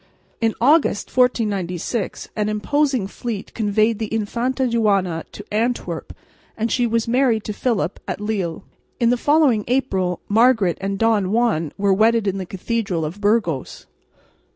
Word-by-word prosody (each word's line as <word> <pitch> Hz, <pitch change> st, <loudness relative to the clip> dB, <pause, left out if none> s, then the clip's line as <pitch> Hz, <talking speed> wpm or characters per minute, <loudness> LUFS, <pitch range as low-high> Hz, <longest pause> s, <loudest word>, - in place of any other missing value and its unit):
In 225 Hz, -1 st, +1 dB
August, 285 Hz, -3 st, +2 dB
1496, 210 Hz, -5 st, 0 dB
an 210 Hz, -1 st, 0 dB
imposing 260 Hz, +2 st, 0 dB
fleet 210 Hz, +1 st, -6 dB
conveyed 215 Hz, 0 st, +1 dB
the 220 Hz, -2 st, -4 dB
Infanta 235 Hz, +5 st, -1 dB
Juana 200 Hz, -8 st, +1 dB
to 205 Hz, -, -10 dB
Antwerp 235 Hz, +3 st, -2 dB, 0.5 s
and 225 Hz, +1 st, -1 dB
she 245 Hz, -2 st, +2 dB
was 230 Hz, 0 st, 0 dB
married 240 Hz, -3 st, +2 dB
to 210 Hz, -, -4 dB
Philip 205 Hz, -, -1 dB
at -, -, -3 dB
Lille. 200 Hz, -6 st, -3 dB, 0.4 s
In 235 Hz, -1 st, +3 dB
the -, -, +3 dB
following 280 Hz, -4 st, +3 dB
April 190 Hz, -9 st, 0 dB
Margaret 220 Hz, -4 st, +3 dB
and 195 Hz, 0 st, -2 dB
Don 215 Hz, -3 st, +2 dB
Juan 215 Hz, -10 st, +1 dB
were 200 Hz, -1 st, +2 dB
wedded 220 Hz, +2 st, +3 dB
in 195 Hz, -1 st, -1 dB
the 185 Hz, -, -5 dB
cathedral 190 Hz, -4 st, -2 dB
of 175 Hz, +7 st, -7 dB
Burgos. 205 Hz, -, 0 dB
220 Hz, 145 wpm, -21 LUFS, 195-235 Hz, 0.5 s, In